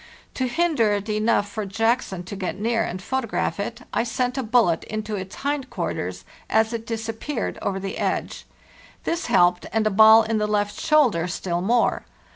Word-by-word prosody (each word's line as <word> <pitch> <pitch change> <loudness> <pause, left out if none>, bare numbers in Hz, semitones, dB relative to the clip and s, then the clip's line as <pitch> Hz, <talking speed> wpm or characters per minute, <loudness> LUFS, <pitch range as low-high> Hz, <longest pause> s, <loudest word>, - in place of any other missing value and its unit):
To 260 - -1
hinder 285 -7 +2
it 205 +1 -2
enough 215 0 +1
for 215 +1 -4
Jackson 210 -2 0
to 185 - -7
get 190 -1 -4
near 230 +1 +1
and 180 - -4
photograph 230 0 -2
it, 235 +4 -4
I - - +2
sent 245 +2 -1
a 270 - -1
bullet 225 -8 +2
into 215 0 -4
its 190 -1 -6
hind 280 -2 -2
quarters - - -4 0.2
as 220 +1 +2
it 225 -1 -5
disappeared 225 +3 -4
over 195 -1 -2
the 195 0 -5
edge. - - -2 0.6
This 335 +1 -2
helped, 175 0 +3
and 220 -1 +1
a 215 - +2
ball 220 +2 +8
in 220 0 -1
the 210 - 0
left 205 -1 -1
shoulder 250 - +3
still 175 -1 -2
more. 235 +5 +2
220 Hz, 180 wpm, -23 LUFS, 200-240 Hz, 0.6 s, ball